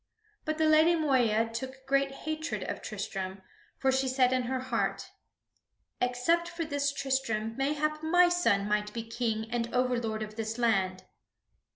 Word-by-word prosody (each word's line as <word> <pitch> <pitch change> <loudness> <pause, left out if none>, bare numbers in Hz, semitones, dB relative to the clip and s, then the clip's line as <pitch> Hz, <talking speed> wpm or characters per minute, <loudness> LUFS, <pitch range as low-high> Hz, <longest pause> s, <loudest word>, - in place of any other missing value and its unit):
But 310 0 -1
the 315 - +2
Lady 315 +2 +5
Moeya 240 -8 +2
took 260 +3 -6
great 275 0 +2 0.2
hatred 315 +1 -3
of - - -5
Tristram, 190 0 -5 0.3
for 265 - +2
she 265 0 +1
said 255 -1 +3
in 255 - +2
her 260 +1 -1
heart: 255 -2 -2 0.9
"Except 250 +8 +1
for 340 -1 -4
this 285 -2 0
Tristram, 245 -6 -1
mayhap 300 +3 0
my 355 +3 +5
son 280 -14 +2
might 210 0 0
be 230 - -3
King 225 -1 -2
and 235 -1 -1
overlord 240 -3 0
of 215 +1 -9
this 225 +1 -3
land." 190 -6 +1
255 Hz, 155 wpm, -30 LUFS, 225-300 Hz, 0.9 s, Lady